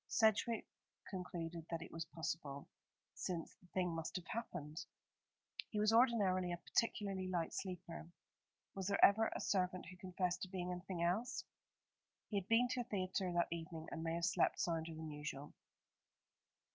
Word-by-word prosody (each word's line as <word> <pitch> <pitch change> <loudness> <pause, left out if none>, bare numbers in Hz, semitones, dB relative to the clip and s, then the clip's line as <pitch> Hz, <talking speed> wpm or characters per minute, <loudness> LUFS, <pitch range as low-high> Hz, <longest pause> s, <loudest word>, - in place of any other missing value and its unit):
Sedgewick 220 +1 +4 0.5
concluded 170 -3 -4
that 165 -1 -2
it - - -10
was 165 -1 -3
possible, 150 -3 -4 0.5
since 170 -3 -3
the 180 - -21
thing 180 -1 0
must 165 0 -3
have 180 -2 -2
happened. 175 -9 -4 0.9
He 210 - -1
was 215 +1 +4
ordinarily 205 -7 +5
a 175 - -1
particularly 195 -1 0
light 175 -3 0
sleeper. 175 -3 -4 0.7
Was 190 -2 -3
there 200 -1 +7
ever 220 +2 +5
a - - -1
servant 185 -2 +1
who 185 - -11
confessed 180 -1 -1
to - - -2
being 180 -1 -2
anything 180 -1 -3
else? 215 +9 +1 0.9
He 210 - 0
had 195 -1 -1
been 230 +3 +5
to 245 - +1
a - - -4
theatre 185 -2 0
that 175 0 +3
evening, 165 -1 -4
and 160 - -3
may 165 0 0
have 170 0 +1
slept - - +3
sounder 165 -1 0
than 160 -1 -5
usual. 150 -1 -5
180 Hz, 160 wpm, -40 LUFS, 165-195 Hz, 0.9 s, there